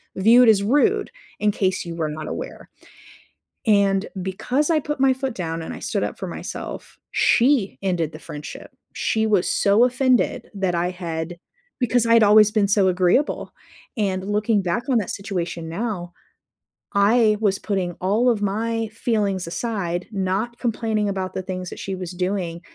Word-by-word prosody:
viewed 230 +5 +6
as 200 -2 +5
rude 290 - +2 0.3
in 210 - +2
case 190 -2 0
you 170 -1 -6
were 160 -2 -2
not 155 +1 -6
aware." - - -7 1.0
And 200 -2 +3 0.2
because 250 - -1
I 320 -2 +3
put 295 -1 -4
my 270 -1 +4
foot 260 -1 -3
down 165 -2 -4
and - - -6
I - - -8
stood - - -2
up - - -4
for - - -4
myself, - - -7
she 240 -5 +2
ended 175 -5 -1
the 155 - -10
friendship. 150 -2 -9 0.2
She 220 0 0
was 205 -5 +2
so 205 +5 +4
offended 255 0 +1
that 190 -3 -1
I 175 +1 0
had 170 -1 -5 0.4
because 245 -1 +2
I'd 230 -1 +5
always 210 0 +7
been 210 -2 +2
so 200 -1 +4
agreeable. 185 +10 +1 0.5
And 195 -1 -1
looking 210 0 +2
back 180 +6 -1
on 245 -4 +3
that 200 - -4
situation 180 -4 -4
now, 175 -1 -4 0.8
I 215 +2 +4
was 200 -3 +1
putting 185 -4 -2
all 215 +7 +2
of 225 -4 0
my 225 +3 -1
feelings 205 -6 -1
aside, 180 -4 -3
not 195 +5 -1
complaining 220 -3 -1
about 190 -1 -3
the 190 - -3
things 185 -1 -5
that - - -9
she 195 -1 -4
was 180 -1 -6
doing. 180 -2 -2
200 Hz, 165 wpm, -22 LUFS, 185-225 Hz, 1.0 s, always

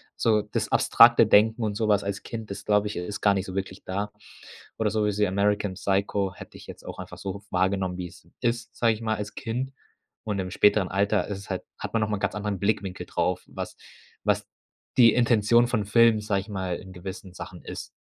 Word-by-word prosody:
so 110 -2 +3
das 105 0 -3
abstrakte 115 -1 +6
Denken 110 +2 +4
und 105 -2 -1
sowas 105 -2 +2
als 100 +1 -4
Kind 110 -3 -6
ist 100 - -7
glaube 105 0 +3
ich, 105 - -5
ist 100 +4 -5
gar 100 -1 +4
nicht 95 - -1
so 95 - -7
wirklich 95 -1 -4
da. 100 +2 -3 0.7
Oder 110 -1 +2
sowas 105 -1 0
wie 105 - +4
“American 100 0 0
Psycho“ 100 0 0
hätte - - -11
ich - - -13
jetzt - - -11
auch - - -7
einfach - - -9
so 100 +1 -5
wahrgenommen, 95 0 0
wie 90 - -4
es 85 -1 -17
ist, 120 -1 -1
sage 115 -1 +3
ich 110 - -8
mal, 110 -1 -1
als 105 0 -6
Kind. 125 +4 -3 0.5
Und 105 -2 -2
im 95 -1 -3
späteren 105 0 +3
Alter 100 0 +1
ist 100 -2 -4
es 100 - -11
halt - - -3
hat - - -6
man 115 - +2
noch 105 - 0
mal 105 - 0
'n - - -8
ganz - - -1
anderen 105 -1 -2
Blickwinkel 100 -2 -1
drauf, - - -1
was - - -7 0.5
was - - +1 0.5
die 115 -3 +7
Intention 120 0 +4
von 110 -5 0
Filmen, 115 +1 +5
sage 100 -2 0
ich 100 - -13
mal, 95 -3 -3
in 95 0 -11
gewissen 95 0 -8
Sachen - - -9
ist. - - -7
105 Hz, 220 wpm, -26 LUFS, 95-110 Hz, 0.7 s, die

